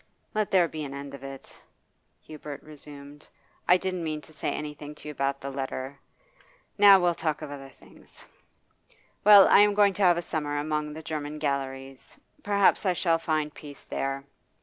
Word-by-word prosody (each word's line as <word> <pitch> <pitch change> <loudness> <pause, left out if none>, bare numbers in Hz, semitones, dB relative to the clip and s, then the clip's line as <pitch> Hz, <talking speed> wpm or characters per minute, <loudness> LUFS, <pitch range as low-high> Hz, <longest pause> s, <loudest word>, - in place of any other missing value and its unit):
'Let 215 -1 0
there 180 -3 +4
be 155 -1 -6
an 140 -1 -7
end 140 0 -8
of 140 -1 -10
it,' 135 -1 -11 0.6
Hubert 150 -2 -9
resumed. 145 -1 -13 0.4
'I 180 - +6
didn't 185 -1 -3
mean 155 -1 -3
to 155 - -17
say 150 - -3
anything 150 0 -7
to 150 - -12
you - - -4
about 140 -1 -2
the 140 - -6
letter. 135 0 -5 0.8
Now, 200 -1 +8
we'll 175 -1 +2
talk 155 -2 -3
of 145 - -7
other 135 -1 -9
things. - - -18 1.0
Well, 205 -1 +9
I - - +6
am 205 0 +4
going 200 -1 +4
to 205 - -5
have 175 -3 +5
a 175 - -3
summer 150 -3 -3
among 150 0 -2
the 160 +1 -9
German 150 -1 -5
galleries; 135 -2 -5 0.2
perhaps 200 -1 +2
I 185 -3 +2
shall 165 -2 +1
find 155 -2 -2
peace 145 -2 -12
there. 135 0 -3
150 Hz, 180 wpm, -27 LUFS, 140-175 Hz, 1.0 s, Well